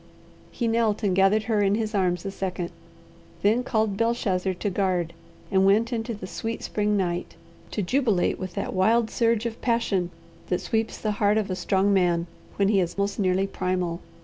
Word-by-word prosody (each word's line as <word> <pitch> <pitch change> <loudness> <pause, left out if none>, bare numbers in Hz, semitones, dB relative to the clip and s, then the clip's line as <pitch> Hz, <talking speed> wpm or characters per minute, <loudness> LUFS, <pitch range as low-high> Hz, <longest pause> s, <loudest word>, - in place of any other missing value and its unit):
He 235 - -2
knelt 225 -1 +1
and 195 -3 +2
gathered 195 +3 +4
her 220 -3 +1
in 200 0 +3
his 220 0 -2
arms 180 -3 0
a 195 - -2
second, 185 -2 -4 0.7
then 220 +5 +3
called 220 -4 0
Belshazzar 200 -5 0
to 205 - -2
guard, 180 -3 0 0.4
and 190 -1 +4
went 220 +5 +3
into 230 0 -2
the 200 - -8
sweet 225 +4 -4
spring 210 0 0
night, 175 -2 -2 0.3
to 210 - -2
jubilate 220 -3 +1
with 185 -2 -6
that - - -3
wild 220 +4 +3
surge 230 -1 +1
of 230 -1 -4
passion 230 -7 +1 0.4
that 180 - 0
sweeps 225 0 -1
the 215 - -1
heart 205 +1 +4
of 210 -3 -1
a - - -1
strong 190 +2 +2
man 175 -3 +2 0.3
when 200 -1 +2
he 205 -2 +4
is 175 0 -1
most 200 +1 -1
nearly 190 0 +2
primal. 180 -3 -2
200 Hz, 185 wpm, -25 LUFS, 185-220 Hz, 0.7 s, gathered